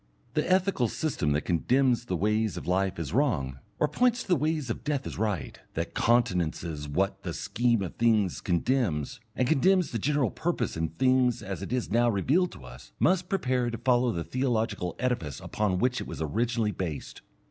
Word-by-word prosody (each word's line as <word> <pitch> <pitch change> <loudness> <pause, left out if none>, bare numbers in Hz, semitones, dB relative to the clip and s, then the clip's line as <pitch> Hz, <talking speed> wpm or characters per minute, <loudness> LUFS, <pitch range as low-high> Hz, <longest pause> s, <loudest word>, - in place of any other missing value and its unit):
The - - 0
ethical 185 -9 +2
system 110 - -1
that 75 - +1
condemns 120 +7 +2
the 95 - -2
ways 105 +3 +1
of - - -6
life 95 +1 0
as 80 -1 -4
wrong, 80 - 0 0.2
or 150 - +2
points 245 +6 +2
to - - -18
the 180 - +5
ways 155 -4 -1
of - - -5
death 145 -2 -1
as - - -6
right, 105 -8 -2 0.2
that - - -3
countenances 85 -9 0
what 95 +7 0
the - - -5
scheme 120 -3 +1
of 90 - -6
things 110 -5 +2
condemns, 90 - 0 0.2
and 125 - +1
condemns 180 +5 +3
the 115 - -2
general 140 -2 +1
purpose - - -2
in 80 0 -1
things 130 -2 +2
as 95 -1 -5
it - - -6
is 125 -1 -1
now 120 +2 +4
revealed 140 - +2
to 65 - -12
us, - - -12
must 180 +1 +2
prepare 130 -10 0
to 115 - -4
follow 120 +1 +2
the 85 -4 -3
theological 115 -8 -1
edifice 120 - -2
upon 105 -4 -1
which 125 +5 +1
it - - -6
was - - -7
originally 110 - 0
based. 85 -7 -5
115 Hz, 190 wpm, -28 LUFS, 90-130 Hz, 0.2 s, the